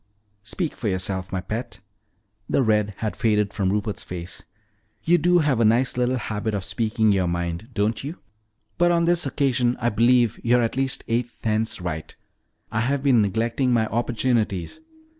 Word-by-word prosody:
"Speak 125 - -4
for 115 - -4
yourself, 95 -1 -2
my 95 -1 -2
pet." 115 +5 -5 0.7
The 135 - +2
red 105 -3 +1
had 110 -2 -3
faded 105 -3 +1
from 95 -2 0
Rupert's 105 0 -2
face. 85 -2 -7 0.6
"You 175 +1 +4
do 175 +3 +4
have 145 -7 +2
a - - +4
nice 115 +4 +3
little 125 +1 +1
habit 110 -1 -3
of 100 -2 -3
speaking 110 0 +1
your 95 -3 +1
mind, 85 +4 -3
don't 105 +4 0
you? 155 +6 -6 0.6
But 175 0 +4
on 170 -1 +2
this 175 -3 +2
occasion 130 -3 +1
I 120 - +1
believe 120 +1 +3
you're 120 +1 +3
at 115 - -1
least 135 -1 -1
eight 120 +1 0
tenths 110 -1 0
right. 80 -3 -5 0.6
I 110 - -1
have 135 +4 0
been 130 -5 +4
neglecting 115 +6 0
my 115 -2 +3
opportunities. 115 - -1
115 Hz, 170 wpm, -23 LUFS, 105-125 Hz, 0.7 s, You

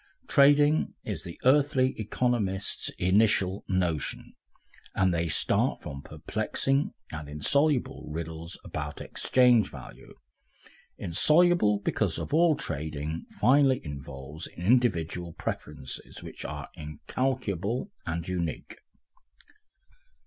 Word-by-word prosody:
Trading 145 +2 +4
is 100 -7 -4
the 85 -2 -9
earthly 135 -1 +4
economists' 105 -3 -1
initial 95 0 +2
notion, 90 -5 -1 0.6
and 95 -1 +3
they 85 0 0
start 80 - +1
from 70 -2 -6
perplexing 110 - -1 0.2
and 75 -2 -6
insoluble 135 - +1
riddles 80 +1 -6
about 75 0 -5
exchange 125 -5 +3
value, - - -12 0.8
insoluble 150 - +4
because 100 -7 0
all 160 +1 +3
trading 75 - -4
finally 135 0 +5
involves 70 +1 -7
individual 90 -5 +1
preferences 75 -4 -6
which - - -9
are - - -5
incalculable 100 - -2
and 85 0 -4
unique. 85 -4 -4
95 Hz, 90 wpm, -28 LUFS, 80-130 Hz, 0.8 s, finally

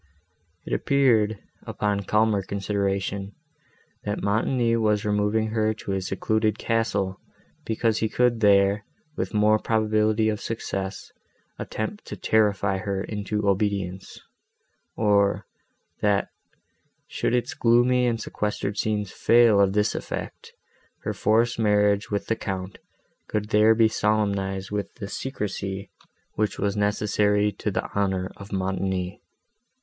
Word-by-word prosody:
It - - -4
appeared, 115 -6 +2 0.2
upon 105 -1 -1
calmer 105 -1 +2
consideration, 100 0 -2 0.7
that 105 0 -3
Montoni 115 +3 +1
was 105 -2 +1
removing 105 +1 +1
her 110 -1 0
to 100 - -6
his 95 -1 -2
secluded 110 +2 0
castle, 105 -4 -1 0.5
because 110 0 +1
he 110 - 0
could 125 -1 +2
there, 100 -1 +4 0.3
with - - -3
more 105 +1 +4
probability 110 0 +1
of 105 -1 -2
success, 95 -4 -4 0.5
attempt 205 - -5
to - - -6
terrify 100 -3 +1
her 100 -1 -2
into 105 0 -3
obedience; 95 -2 -1 0.8
or, 100 -2 +2 0.6
that, 100 -1 +2 0.8
should 125 - -1
its 125 +1 -1
gloomy 125 +1 +3
and 115 -1 0
sequestered 105 -1 -3
scenes 105 -3 -1
fail 115 -3 +5
of 95 -1 +3
this 105 0 +2
effect, - - -6 0.5
her - - -2
forced 115 +2 +2
marriage 105 -1 +2
with 100 -1 -2
the 115 - 0
Count 95 -3 -5 0.5
could 105 0 -2
there 110 +1 +5
be 115 0 +5
solemnized 100 -3 -1
with 105 -1 -3
the 105 -5 -6
secrecy, 100 -5 -4 0.4
which 105 -1 -1
was 100 0 -1
necessary 105 0 +1
to - - -3
the - - -2
honour 95 -2 0
of 100 +1 -11
Montoni. 95 0 -2
105 Hz, 125 wpm, -25 LUFS, 100-110 Hz, 0.8 s, fail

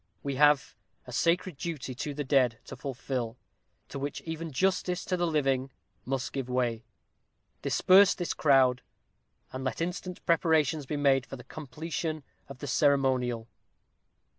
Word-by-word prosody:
We 140 - -2
have 145 -1 +4 0.3
a 125 - -10
sacred 170 +5 +1
duty 150 -5 -4
to 140 +3 -5
the 145 - -2
dead 130 -4 +3
to - - -8
fulfil, 125 -3 -4 0.5
to 140 - -6
which 140 +1 -4
even 160 0 -5
justice 180 +4 0
to 185 - 0
the 175 -1 0
living 135 -4 +1 0.4
must 135 0 -2
give 135 -2 -3
way. 120 -3 -1 0.8
Disperse 190 +1 +5
this 175 - -2
crowd, 130 -4 +4 0.7
and 130 0 -4
let 130 -4 -2
instant 180 +1 -4
preparations 160 -3 +2
be 150 - -2
made 135 -3 +3
for - - -7
the 125 - -11
completion 155 +2 -5 0.3
of 140 - -9
the 145 - -7
ceremonial. 130 -4 +2
140 Hz, 145 wpm, -29 LUFS, 130-160 Hz, 0.8 s, Disperse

